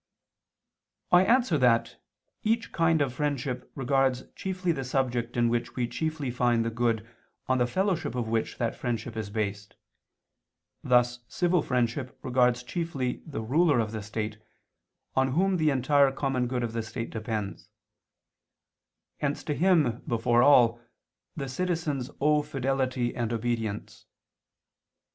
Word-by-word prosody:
I 180 +1 +7
answer 230 - +3
that, 120 -3 +2 0.5
Each 225 +1 0
kind 165 -2 +3
of 130 -3 -3
friendship 135 -3 -3
regards 135 -1 +1
chiefly 185 -2 -2
the 135 -5 -2
subject 125 -2 -1
in 120 0 +3
which 120 0 -1
we 125 -2 0
chiefly 155 -1 -3
find 120 -2 +2
the 115 - -1
good 115 -1 0 0.4
on 130 0 +2
the 120 - +2
fellowship 180 - -1
of 120 -2 -2
which 115 0 -1
that 115 -2 -1
friendship 115 -2 -3
is 110 -2 -4
based: 100 -1 -3 1.1
thus 125 -1 +3
civil 175 +3 +1
friendship 125 0 -1
regards 125 -1 +2
chiefly 140 -4 -3
the 145 -7 -4
ruler 145 +5 +3
of 110 -2 -1
the 110 -1 -4
state, 105 +1 -4 0.8
on 130 0 +2
whom 190 +4 +2
the 155 -2 +3
entire 140 +1 +3
common 135 -2 -1
good 125 0 -2
of 115 -1 -3
the 115 - -1
state 115 +1 -5
depends; 110 -2 -4 1.5
hence 145 0 -2
to 150 - -2
him 155 -9 +3
before 120 +1 +2
all, 120 -4 +5 0.5
the 140 -3 -4
citizens 150 -3 -2
owe 150 +1 +3
fidelity 135 -3 -1
and 120 -2 -2
obedience. 115 -2 -3
125 Hz, 140 wpm, -28 LUFS, 115-145 Hz, 1.5 s, I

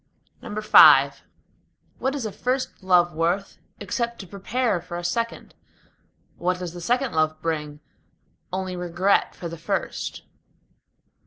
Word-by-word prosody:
V - - -10 1.5
What 265 +2 -1
is 270 -5 -3
a 215 - -3
first 255 +3 -3
love 180 -2 +3
worth, 170 +5 -1 0.2
except 235 -1 -3
to 195 - -9
prepare 205 +1 -1
for 175 0 -7
a 175 - -6
second? 230 +7 -3 0.8
What 180 +1 0
does 180 -2 -6
the 175 - -8
second 245 +7 0
love 155 0 +1
bring? 150 -2 -4 0.7
Only 185 0 -3
regret 180 +2 +1
for 175 - -6
the 170 -1 -8
first. 165 - -3
180 Hz, 130 wpm, -24 LUFS, 170-230 Hz, 1.5 s, love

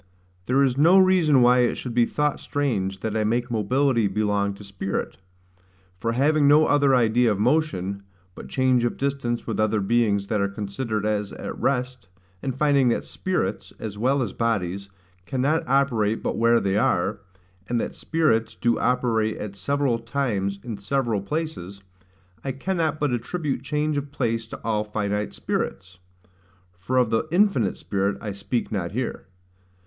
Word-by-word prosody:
There 135 +2 +3
is 130 0 +1
no 170 +6 +6
reason 180 -8 +5
why 125 +1 +5
it 120 -1 +2
should 125 - -5
be 120 -1 +3
thought 150 -1 0
strange 95 -10 -2
that 110 -1 -3
I 110 - +1
make 120 +3 0
mobility 120 +1 +2
belong 100 0 0
to 100 - -12
spirit; 100 -1 -4 0.8
for 115 +4 -1
having 145 +3 +3
no 150 +2 +6
other 140 -2 +4
idea 120 -1 +3
of 105 - 0
motion, 110 - 0 0.3
but - - -10
change 130 -2 +2
of 120 - -1
distance 135 -4 -2
with - - -3
other 110 0 +2
beings 100 -1 +1
that 105 -2 +1
are 100 - +1
considered 105 +2 -3
as 105 -1 -1
at - - -6
rest; 125 -5 -2 0.3
and 130 -2 -3
finding 140 -3 +3
that 115 - 0
spirits, 185 -1 -3
as 110 -3 -6
well 130 +5 +1
as 100 - -5
bodies, 100 -4 -1 0.4
cannot 135 - +1
operate 120 -6 +1
but - - -1
where 115 +1 +4
they 100 -1 0
are; 105 0 +1 0.5
and 120 -1 +1
that - - -3
spirits 155 -9 0
do 120 -1 +1
operate 115 -3 +1
at 105 -2 -6
several 130 +4 0
times 110 -7 -2
in 115 -4 -5
several 115 0 -1
places, 100 - -5 0.6
I 135 - -2
cannot 160 +1 -1
but 145 -3 +1
attribute 135 +2 -2
change 150 +2 -1
of 140 0 -4
place 115 -5 -1
to - - -8
all 105 -2 0
finite 105 -1 -3
spirits: 95 -2 -4 0.8
(for 130 +8 -1
of 125 -3 +3
the 115 +7 +1
Infinite 175 - +2
Spirit 100 0 -1
I 105 - -5
speak 100 +5 -3
not 95 -4 -3
here). 125 +3 -4
120 Hz, 165 wpm, -24 LUFS, 105-140 Hz, 0.8 s, no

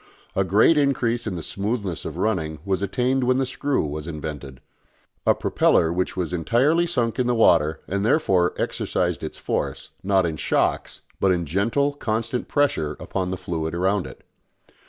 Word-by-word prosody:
A 95 - +3
great 110 - +4
increase 120 -5 0
in 95 - -2
the 85 - -5
smoothness 100 -4 -3
of 80 - -5
running 90 -6 -1
was 95 -2 0
attained 125 +6 0
when 130 +1 +2
the 135 - +1
screw 135 - -1
was 75 +1 -5
invented 75 -4 -6 0.7
a - - +5
propeller 80 0 +2
which 90 +1 -2
was 90 -2 -2
entirely 135 - +2
sunk 120 -8 -1
in 125 - +2
the 125 - +2
water 80 -8 +3
and 100 +1 -1
therefore 95 - +2
exercised - - -1
its - - -6
force, - - -3
not 95 -2 +2
in 80 -2 -2
shocks, - - 0 0.2
but 95 - +3
in 85 -2 0
gentle 115 - +1
constant 115 -2 -2
pressure 135 - 0
upon 90 -1 -3
the 95 - -3
fluid 85 -3 -3
around 95 +2 +1
it. - - -13
100 Hz, 170 wpm, -23 LUFS, 85-125 Hz, 0.7 s, a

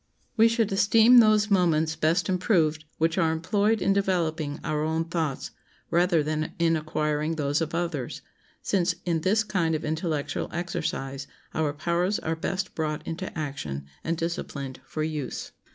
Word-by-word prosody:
We 225 0 +6
should 230 -2 +1
esteem 225 +5 +6
those 215 -2 +4
moments 160 -4 +3
best 165 +2 +1
improved 170 -5 +1
which 165 +2 +1
are 165 -3 +3
employed 205 +6 +1
in 195 - +3
developing 165 -6 0
our 150 0 -1
own 160 +1 0
thoughts, 165 -5 -2 0.4
rather 170 -2 +3
than 155 +1 -2
in 165 -1 +3
acquiring 155 0 -1
those 145 0 0
of 160 0 -2
others, 165 -7 -3 0.4
since 180 -2 +1
in 165 -2 0
this 210 +6 +2
kind 170 -6 0
of 155 - -3
intellectual 155 -2 -2
exercise 140 -6 -3 0.3
our 155 -2 0
powers 170 +6 0
are 160 +1 -2
best 185 +3 -3
brought 155 -2 -3
into 180 +3 -4
action 75 - -4 0.2
and 165 +1 -1
disciplined 145 -5 -4
for 155 - -3
use. 155 -4 -4
165 Hz, 150 wpm, -26 LUFS, 155-185 Hz, 0.4 s, We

